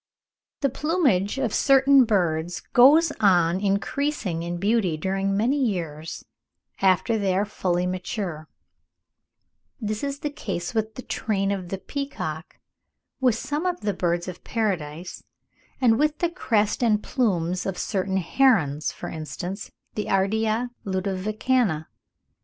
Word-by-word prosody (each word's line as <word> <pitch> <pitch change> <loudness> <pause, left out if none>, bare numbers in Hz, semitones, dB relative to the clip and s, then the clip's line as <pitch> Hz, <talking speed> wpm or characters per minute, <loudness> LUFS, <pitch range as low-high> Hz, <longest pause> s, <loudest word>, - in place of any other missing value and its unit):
The 275 - +3
plumage 270 - +1
of 255 -6 -1
certain 275 -1 +5
birds 175 -5 0
goes 295 +6 +7
on 180 -4 +4
increasing 200 - -1
in 170 +1 -3
beauty 195 -3 +1
during 195 +3 -1
many 265 +6 +2
years 165 - -3 0.6
after 195 +4 +3
they 190 -2 +1
are 200 - +2
fully 180 -4 -1
mature; 180 -3 -4 1.3
this 215 0 -3
is 280 0 -3
the 295 - -2
case 195 - -4
with 220 -1 -1
the 255 - -7
train 195 -3 -1
of 185 -3 -3
the 195 - -3
peacock, 185 - -5 0.6
with 250 -4 +3
some 295 +9 -2
of 360 -1 -2
the 205 -1 0
birds 175 -1 -1
of 180 -1 -8
paradise, 180 -7 -3 0.6
and 230 -3 +4
with 300 0 +2
the 345 -1 0
crest 215 - 0
and 215 -3 +2
plumes 180 -8 0
of 190 - -3
certain 190 -1 -1
herons, 175 - +2
for - - -8
instance, 175 +6 -6 0.2
the 210 - -3
Ardea 220 +5 +1
ludovicana. 195 -1 0
200 Hz, 130 wpm, -25 LUFS, 180-245 Hz, 1.3 s, goes